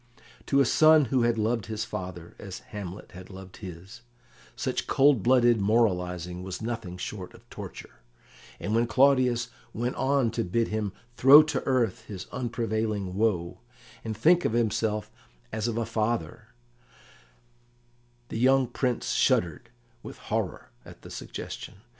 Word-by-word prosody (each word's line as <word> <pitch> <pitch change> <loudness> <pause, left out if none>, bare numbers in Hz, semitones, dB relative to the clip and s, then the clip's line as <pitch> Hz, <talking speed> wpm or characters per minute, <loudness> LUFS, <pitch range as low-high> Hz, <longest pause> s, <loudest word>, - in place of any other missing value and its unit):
To 140 - +3
a - - +4
son 155 +3 +6
who 130 - +4
had 120 -1 +2
loved 110 +1 0
his 110 0 -3
father, 90 -5 -7
as 95 -2 -7 0.2
Hamlet 100 -2 -7
had 95 +1 -11
loved 95 -1 -11
his, 95 +1 -10 0.5
such - - -2
cold 135 -4 +4
blooded 120 -2 +4
moralising 90 -5 0
was 95 0 -6
nothing 110 -6 -5
short 95 0 -6
of - - -19
torture, - - -9 0.6
and 105 - -3
when 115 +1 +2
Claudius 125 -3 +3 0.3
went 120 +3 -2
on 135 -3 +2
to 115 0 -1
bid 115 +5 0
him 105 -2 -2 0.3
throw 140 +4 +9
to 155 -3 -2
earth 125 -7 0
his 95 -3 -7
unprevailing 110 -5 -2
woe, 95 -5 0 0.4
and 110 -2 -4
think 170 +10 +4
of - - 0
himself 110 -2 0 0.4
as 110 +1 -2
of 115 -1 -2
a 115 - 0
father, 110 -7 -2 1.8
the 110 - -4
young 130 +2 +4
Prince 125 0 -2
shuddered 90 +7 +1 0.3
with - - -9
horror - - -4
at - - -14
the - - -11
suggestion. - - -7
110 Hz, 145 wpm, -27 LUFS, 95-120 Hz, 1.8 s, throw